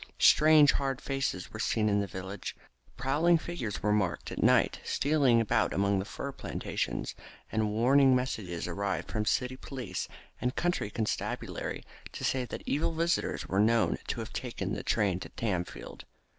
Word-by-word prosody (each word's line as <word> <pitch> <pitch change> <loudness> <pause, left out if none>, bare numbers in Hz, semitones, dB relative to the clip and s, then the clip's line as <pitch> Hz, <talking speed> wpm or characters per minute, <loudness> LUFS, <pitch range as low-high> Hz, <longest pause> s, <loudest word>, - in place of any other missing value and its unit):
Strange 155 -1 +7
hard 135 -2 -1
faces 135 -11 -3
were 110 - -6
seen 110 0 +1
in 100 -1 +3
the 100 - -1
village 95 +1 -6
street, - - -27 0.3
prowling 150 +7 +3
figures 160 - -5
were 105 - +2
marked 100 -5 -1
at - - -4
night - - +4
stealing 140 -5 +3
about 115 - +1
among 100 0 +2
the 95 - -3
fir 140 +6 -5
plantations, - - -3 0.4
and 110 -1 +1
warning 130 +5 +5
messages 105 -10 -2
arrived 100 +3 -2
from 105 -2 -1
city 125 +3 0
police 125 -8 -5 0.3
and 125 +1 -1
county 175 -12 0
constabulary 110 0 -3 0.3
to - - -7
say 130 -1 +1
that - - -7
evil 155 +3 0
visitors 170 +1 0
were 95 - 0
known 115 +2 +3
to - - -2
have - - -8
taken - - -3
train 95 -4 +1
to - - -8
Tamfield. 90 -6 -4
115 Hz, 160 wpm, -30 LUFS, 100-135 Hz, 0.4 s, Strange